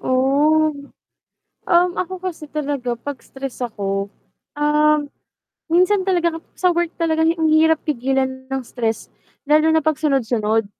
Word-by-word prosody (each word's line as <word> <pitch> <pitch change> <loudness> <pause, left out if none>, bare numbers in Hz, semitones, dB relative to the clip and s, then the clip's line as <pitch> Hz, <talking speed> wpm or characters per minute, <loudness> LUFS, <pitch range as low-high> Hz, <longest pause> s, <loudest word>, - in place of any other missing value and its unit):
Oh, 290 +4 +2 1.0
um, 355 +1 +5
ako 370 +1 -4
kasi 340 -5 -6
talaga 275 -5 -3
'pag 285 0 -7
stress 270 -2 -7
ako, 200 -3 -3 0.5
um, 300 0 +3 0.6
minsan 365 +4 +3
talaga 345 -3 0
kap - - -32
sa 360 -1 +3
work 345 -1 0
talaga 320 -1 0
hi 330 - +2
ang 320 -1 +2
hirap 320 +1 +4
pigilan 260 -1 -1
ng 270 -1 -3
stress, 225 -3 -3 0.3
lalo 305 +2 +4
na 320 -1 +2
pagsunod-sunod. 245 -8 +1
300 Hz, 135 wpm, -20 LUFS, 260-320 Hz, 1.0 s, um